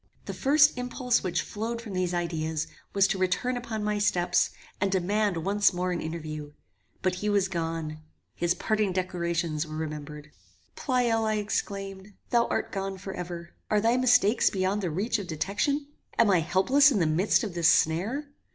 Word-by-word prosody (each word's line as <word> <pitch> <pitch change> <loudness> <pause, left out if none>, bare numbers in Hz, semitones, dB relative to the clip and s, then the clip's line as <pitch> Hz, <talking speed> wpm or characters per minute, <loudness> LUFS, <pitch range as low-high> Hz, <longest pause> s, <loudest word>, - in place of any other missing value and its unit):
The - - -5
first 290 -1 +4
impulse 250 0 0
which 175 -2 -1
flowed 230 +2 -4
from 225 -4 -8
these 185 -1 0
ideas 160 -3 -2 0.3
was 195 -1 +4
to 195 - -1
return 190 +7 0
upon 230 -3 -4
my 210 0 0
steps, 180 -4 +2 0.3
and 200 -1 +1
demand 200 +1 +1
once 200 0 +3
more 180 +1 -1
an 175 - -2
interview; 155 -2 -6 0.5
but 185 -1 +2
he 210 - 0
was 200 -2 +2
gone: 165 -3 -3 0.3
his 175 0 0
parting 215 -3 0
declarations 170 -3 -1
were 155 - -7
remembered. 150 -1 -6 0.4
Pleyel, 235 -3 +1
I 215 0 +1
exclaimed, 200 -1 -4 0.2
thou 235 -1 +3
art - - -2
gone 195 -1 -3
for 195 0 -7
ever! 175 -1 -6 0.2
Are 210 - +3
thy 230 +3 +3
mistakes 250 -3 +4
beyond 190 +2 0
the 180 - -1
reach 205 +8 -1
of 195 - -6
detection? 205 - -1 0.3
Am 225 -3 +5
I 180 - +5
helpless 255 - +4
in 235 - +1
the 175 - +2
midst 175 +10 +2
of 205 -5 -4
this 170 -1 +4
snare? 210 - +1
190 Hz, 175 wpm, -27 LUFS, 170-215 Hz, 0.5 s, Am